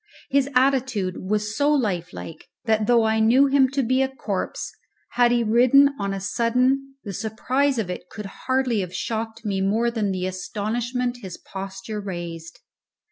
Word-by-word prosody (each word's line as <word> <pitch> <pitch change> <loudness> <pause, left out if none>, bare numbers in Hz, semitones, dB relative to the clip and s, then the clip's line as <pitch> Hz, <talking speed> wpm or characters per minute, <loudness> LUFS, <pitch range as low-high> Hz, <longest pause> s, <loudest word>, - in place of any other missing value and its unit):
His 275 0 +2
attitude 255 -8 +2
was 210 0 0
so 290 +4 +2
lifelike 180 - -2 0.2
that, 220 -2 +2
though 235 -2 +5
I 220 0 +2
knew 240 +5 +5
him 275 -1 +4
to 275 0 0
be 255 +3 +2
a 265 - +1
corpse, 210 -7 -4 0.4
had 240 0 +3
he 240 -1 +2
risen 255 +5 +5
on 200 -1 -1
a 195 - -3
sudden 255 +6 +1
the 200 - -6
surprise 255 +7 0
of 200 -5 -1
it 180 0 -7
could 210 -1 -8 0.2
hardly 260 -4 +2
have 180 -2 -4
shocked 225 0 -4
me 195 -2 -1
more 220 +5 +1
than 220 -3 -1
the 185 -1 -2
astonishment 240 +6 -2
his 185 -3 -7
posture 195 +2 -6
raised. 170 -4 -7
225 Hz, 165 wpm, -23 LUFS, 195-255 Hz, 0.4 s, though